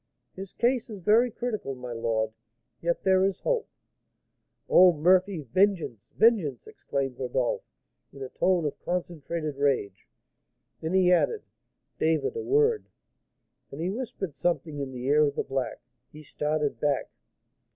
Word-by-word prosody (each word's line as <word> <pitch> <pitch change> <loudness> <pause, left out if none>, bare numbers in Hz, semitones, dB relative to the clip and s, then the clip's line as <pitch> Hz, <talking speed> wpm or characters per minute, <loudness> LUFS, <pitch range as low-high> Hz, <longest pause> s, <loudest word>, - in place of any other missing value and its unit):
"His 195 0 -8
case 245 0 +1
is 215 - -7
very 215 +7 +4
critical, 220 - -4
my 125 -1 -8
lord; 115 -1 -1 0.5
yet 170 0 -1
there 190 0 +4
is 195 0 0
hope." - - -1 1.0
"Oh, 180 0 +7
Murphy! 180 +3 +3
vengeance! 155 - 0
vengeance!" 200 - +3
exclaimed 135 -2 -4
Rodolph, 125 -1 -1 0.5
in 135 - -9
a 130 - -6
tone 180 +3 +1
of 145 - -3
concentrated 170 -4 -4
rage. 130 -9 0 0.7
Then 160 +2 -3
he 185 -1 +5
added, 415 - +1 0.6
"David, 160 - +1
a 455 - -2
word 440 +1 +2 0.4
" - - -50
And 140 - -8
he 175 +3 -1
whispered 205 - -5
something 155 0 -2
in 140 -1 -4
the 125 -1 -7
ear 145 +3 +4
of 140 - -3
the - - -1
black. 135 -1 -3 0.3
He 155 +1 -12
started 150 0 -2
back. 145 -3 0
160 Hz, 145 wpm, -27 LUFS, 135-195 Hz, 1.0 s, Oh